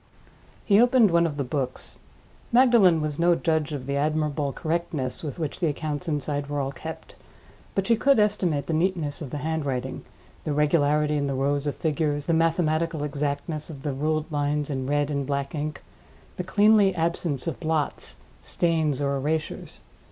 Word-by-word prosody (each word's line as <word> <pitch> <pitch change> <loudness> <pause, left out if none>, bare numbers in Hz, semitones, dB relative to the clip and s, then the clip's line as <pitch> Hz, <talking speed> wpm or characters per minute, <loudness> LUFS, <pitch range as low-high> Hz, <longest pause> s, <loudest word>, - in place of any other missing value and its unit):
He 205 0 +5
opened 240 -4 +5
one 170 0 +4
of 145 -3 -5
the 140 - 0
books. 130 -1 -3 0.5
Magdalen 235 -9 +5
was 150 0 -3
no 170 0 +4
judge 160 -2 0
of 140 -4 -4
the 140 +1 -1
admirable 150 -1 0
correctness 155 -5 -2
with 150 -4 -5
which 155 -4 -4
the 170 - +1
accounts 150 +2 -3
inside 145 -1 -2
were 145 0 -2
all 135 -1 -1
kept; 160 +3 -8 0.6
but 195 - +1
she 230 - +4
could 275 +4 +3
estimate 185 -9 +1
the 165 - -2
neatness 165 -3 0
of 145 - -5
the 145 - -4
handwriting, 145 -4 -3 0.4
the 150 - -2
regularity 150 0 +2
in 140 -1 0
the 135 - -2
rows 140 +2 0
of 145 - -1
figures, 150 -2 -1
the 165 - +1
mathematical 165 -1 +1
exactness 150 +2 -3
of 140 -4 -9
the 145 -3 -2
ruled 155 +3 -1
lines 145 0 -1
in 130 -2 -3
red 145 +1 +1
and 140 -2 -2
black 140 -1 -2
ink, 150 -2 -4 0.5
the 180 - -3
cleanly 205 0 +4
absence 165 -4 -1
of 165 - -3
blots, 160 -3 -2 0.3
stains, 160 -5 0
or 140 0 0
erasures. 155 +3 -3
150 Hz, 175 wpm, -25 LUFS, 145-165 Hz, 0.6 s, He